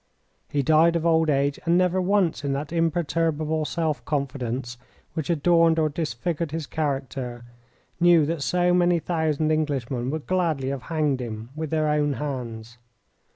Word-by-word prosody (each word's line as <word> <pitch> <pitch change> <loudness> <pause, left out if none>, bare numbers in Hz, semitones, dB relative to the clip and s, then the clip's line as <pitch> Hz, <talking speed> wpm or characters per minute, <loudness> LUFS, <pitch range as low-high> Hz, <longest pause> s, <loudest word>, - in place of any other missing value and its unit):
He 140 -1 0
died 160 +4 +4
of 165 -1 -1
old 160 -1 +3
age, 140 0 +1
and 170 0 +3
never 180 0 +2
once 185 -5 +1
in 140 -1 -1
that 145 +4 -4
imperturbable 160 -2 0
self 155 0 -2
confidence 130 -4 -3 0.3
which 160 -2 -4
adorned 165 0 +3
or 155 -1 +2
disfigured 160 +2 -3
his 160 0 -4
character 135 -5 -3 0.5
knew 170 -3 +5
that 160 0 -2
so 180 +4 +2
many 175 -1 +3
thousand 160 -2 0
Englishmen 135 -5 -1
would 155 +1 -4
gladly 165 -8 0
have 135 -2 -3
hanged 150 -5 +1
him 110 -1 -6
with 155 -1 -4
their 155 0 +1
own 150 -1 +1
hands. 120 -5 -6
155 Hz, 155 wpm, -25 LUFS, 140-165 Hz, 0.5 s, knew